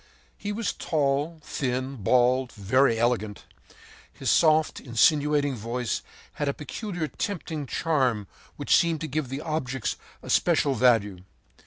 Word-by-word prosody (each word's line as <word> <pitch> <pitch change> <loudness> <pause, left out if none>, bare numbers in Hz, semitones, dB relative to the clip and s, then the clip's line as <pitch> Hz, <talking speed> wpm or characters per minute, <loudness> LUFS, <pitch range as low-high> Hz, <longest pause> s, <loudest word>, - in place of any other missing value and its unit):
He 205 - -5
was 215 +1 -2
tall, 150 +1 -1
thin, 130 -1 -3
bald, 125 +3 +2
and 100 - -11
very 130 +2 +4
elegant. 110 -3 -1 0.7
His - - -1
soft, 155 -1 +3
insinuating 145 +3 +2
voice 120 +1 -3 0.4
had 145 - +1
a 140 - -2
peculiar, 175 - -4
tempting 160 -6 -4
charm 130 -9 0 0.3
which - - +2
seemed 165 -3 +2
to 160 - -3
give 145 -2 -2
the 135 +2 -4
objects 135 -6 -2 0.3
a - - -4
special 150 -5 +3
value. 110 -6 +3
135 Hz, 135 wpm, -26 LUFS, 125-155 Hz, 0.7 s, very